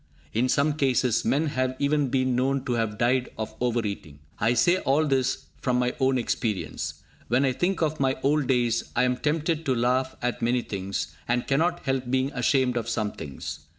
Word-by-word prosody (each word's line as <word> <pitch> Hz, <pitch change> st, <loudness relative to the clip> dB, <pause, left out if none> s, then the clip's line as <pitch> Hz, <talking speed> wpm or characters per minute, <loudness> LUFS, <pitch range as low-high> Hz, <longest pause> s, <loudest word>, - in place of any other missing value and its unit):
In 125 Hz, +4 st, +1 dB
some 145 Hz, +3 st, +2 dB
cases, 130 Hz, -4 st, +2 dB
men 145 Hz, +4 st, +2 dB
have 130 Hz, -2 st, -1 dB
even 145 Hz, 0 st, +1 dB
been 130 Hz, -1 st, +1 dB
known 135 Hz, +1 st, 0 dB
to 125 Hz, -, 0 dB
have 110 Hz, -3 st, -1 dB
died 125 Hz, +2 st, +1 dB
of 110 Hz, 0 st, -4 dB
over 120 Hz, -2 st, +1 dB
eating. 80 Hz, -8 st, -5 dB, 0.2 s
I 115 Hz, +3 st, +2 dB
say 175 Hz, +9 st, +4 dB
all 145 Hz, +1 st, +2 dB
this 135 Hz, -3 st, 0 dB, 0.2 s
from 125 Hz, -1 st, +1 dB
my 125 Hz, 0 st, +1 dB
own 130 Hz, -1 st, +3 dB
experience. 115 Hz, -4 st, -3 dB, 0.2 s
When 125 Hz, +4 st, +2 dB
I 130 Hz, -, +2 dB
think 180 Hz, +7 st, 0 dB
of 155 Hz, 0 st, -1 dB
my 135 Hz, -1 st, +1 dB
old 145 Hz, 0 st, +2 dB
days, 120 Hz, -3 st, +1 dB
I -, -, +3 dB
am 125 Hz, 0 st, +2 dB
tempted 160 Hz, +2 st, 0 dB
to 135 Hz, -5 st, +1 dB
laugh 125 Hz, +2 st, +1 dB
at 125 Hz, 0 st, -2 dB
many 120 Hz, +1 st, +1 dB
things, 95 Hz, -7 st, -4 dB
and 120 Hz, 0 st, 0 dB
cannot 165 Hz, +5 st, +1 dB
help 135 Hz, -2 st, -2 dB
being 130 Hz, +2 st, +1 dB
ashamed 125 Hz, 0 st, +2 dB
of 115 Hz, 0 st, -2 dB
some 110 Hz, -2 st, -1 dB
things. 75 Hz, -2 st, -7 dB
130 Hz, 195 wpm, -26 LUFS, 120-140 Hz, 0.2 s, say